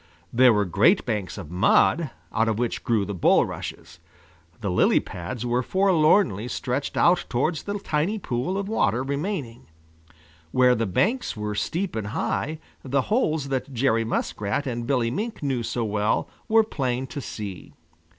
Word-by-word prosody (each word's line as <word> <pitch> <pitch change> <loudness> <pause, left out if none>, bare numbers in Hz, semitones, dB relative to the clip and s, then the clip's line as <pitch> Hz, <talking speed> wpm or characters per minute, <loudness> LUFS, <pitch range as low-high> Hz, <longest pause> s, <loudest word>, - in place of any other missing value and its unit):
There 125 +1 +6
were 105 -2 +2
great 105 - +3
banks 105 -7 -3
of 85 -6 -8
mud, 130 - +3 0.2
out 115 +1 +2
of 110 -2 0
which 120 0 -2
grew 110 -4 +1
the 100 - -4
bulrushes. 90 - 0 0.6
The 100 -4 -2
lily 90 - +4
pads 90 +8 -6
were 120 +1 +1
forlornly 160 - +3
stretched 125 +2 -3
out 175 +1 +4
towards 145 +6 0
the 205 0 -4
tiny 180 +2 -1
pool 140 - -2
of 200 0 -3
water 125 - +1
remaining. 140 - -4 0.8
Where 125 -1 +5
the 115 -2 0
banks 215 - 0
were 105 0 -3
steep 175 - -2
and 110 -2 -3
high, 150 +7 -2 0.3
the 135 +1 +1
holes 160 - +1
that 135 0 -3
Jerry 115 -2 +2
Muskrat 110 +2 -2
and 120 -2 -3
Billy 125 -4 +1
Mink 215 - -4
knew 135 -4 0
so 115 0 -2
well 105 0 0 0.2
were 225 -1 +5
plain 130 - -2
to 140 +2 -6
see. 100 -7 -7
125 Hz, 160 wpm, -25 LUFS, 110-155 Hz, 0.8 s, There